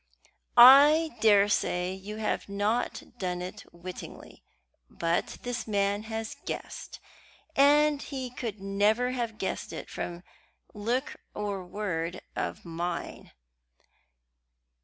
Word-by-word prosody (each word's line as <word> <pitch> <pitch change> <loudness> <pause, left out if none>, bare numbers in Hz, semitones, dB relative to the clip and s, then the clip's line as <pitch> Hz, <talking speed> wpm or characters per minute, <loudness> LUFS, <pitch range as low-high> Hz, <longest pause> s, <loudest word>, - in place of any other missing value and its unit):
"I 290 +6 +9
daresay 200 -4 +3
you 195 +3 -7
have 215 -2 -2
not 205 +4 -1 0.2
done 180 -2 -2
it 180 +1 -7
wittingly; 175 +1 -10 0.5
but 170 0 -1
this 245 -2 -4
man 200 -1 +1
has 220 0 -4
guessed, - - -6 0.6
and 290 +1 +5
he 260 -3 -5
could 230 -4 -5
never 205 +5 +1
have 235 -4 -3
guessed 190 - -3
it - - -7
from 175 0 -5 0.5
look 240 +7 -2 0.2
or 200 -2 -3
word 180 -3 -4
of - - -4
mine." 170 +1 -4
210 Hz, 105 wpm, -28 LUFS, 185-245 Hz, 0.6 s, I